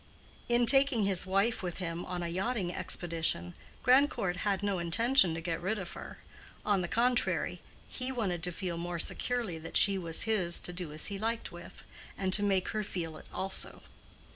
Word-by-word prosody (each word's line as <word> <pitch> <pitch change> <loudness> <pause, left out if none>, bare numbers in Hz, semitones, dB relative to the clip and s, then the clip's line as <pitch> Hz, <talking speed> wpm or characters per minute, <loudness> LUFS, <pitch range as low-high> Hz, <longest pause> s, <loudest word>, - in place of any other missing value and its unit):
In 240 0 +3
taking 270 -2 +5
his 195 -2 +1
wife 195 +5 +1
with 180 -2 -4
him 175 -1 -4
on 180 -1 -4
a - - -2
yachting 185 +1 -2
expedition, 160 - -1 0.3
Grandcourt 250 -9 +3
had 200 0 -1
no 200 -3 0
intention 185 +2 +4
to 165 - -5
get 170 -1 -2
rid 200 +5 -1
of 185 -3 -6
her; - - -9 0.5
on 205 -3 +2
the 175 - -3
contrary, 245 +5 0 0.3
he 255 0 -4
wanted 195 -9 -2
to 180 0 -1
feel 175 -1 -4
more 175 0 -4
securely 225 -1 -1
that 160 - -2
she 200 -2 +5
was 165 -2 +1
his 190 -6 +1
to 180 - -2
do 175 -3 -5
as 155 +1 +3
he 195 - -5
liked 225 +2 -2
with, 175 0 -12 0.3
and 190 -1 -1
to 205 - +6
make 195 -2 +1
her 215 - -2
feel 165 -5 -5
it - - -13
also. 190 0 -1
190 Hz, 190 wpm, -31 LUFS, 175-220 Hz, 0.5 s, to